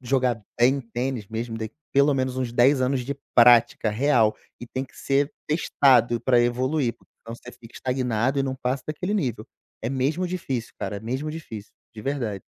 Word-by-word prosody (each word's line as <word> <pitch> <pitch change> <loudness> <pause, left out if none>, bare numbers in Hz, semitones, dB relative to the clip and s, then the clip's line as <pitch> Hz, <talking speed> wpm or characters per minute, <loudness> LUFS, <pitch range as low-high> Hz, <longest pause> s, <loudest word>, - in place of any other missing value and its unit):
jogar 125 -3 0 0.2
bem 130 +3 +4
tênis 120 -1 -4
mesmo 115 0 -4
d 110 -1 -4 0.2
pelo 140 +1 +4
menos 130 -1 -1
uns 130 -2 -2
10 130 +3 +4
anos 130 +1 +1
de 140 - -3 0.2
prática 120 -2 +5
real 115 -2 +3 0.3
e 120 - -7
tem 130 +2 -4
que 135 - -21
ser 140 +1 +1 0.2
testado 130 -6 +3
para 125 -2 +3
evoluir, 125 +2 0
porque - - -29
se - - -55
não 115 - -5
você 125 +1 -12
fica 115 -1 -16
estagnado 125 0 -1
e 135 - +2
não 135 -1 -2
passa 130 0 -2
daquele 180 +6 -3
nível. 125 - -2 0.4
É 115 - -2
mesmo 145 +7 0
difícil, 135 -10 -4
cara, 105 - -4
é - - -7
mesmo 130 +7 -3
difícil, 115 -10 -8 0.2
de 110 - -9
verdade. 115 -7 -3
125 Hz, 190 wpm, -24 LUFS, 115-135 Hz, 0.4 s, prática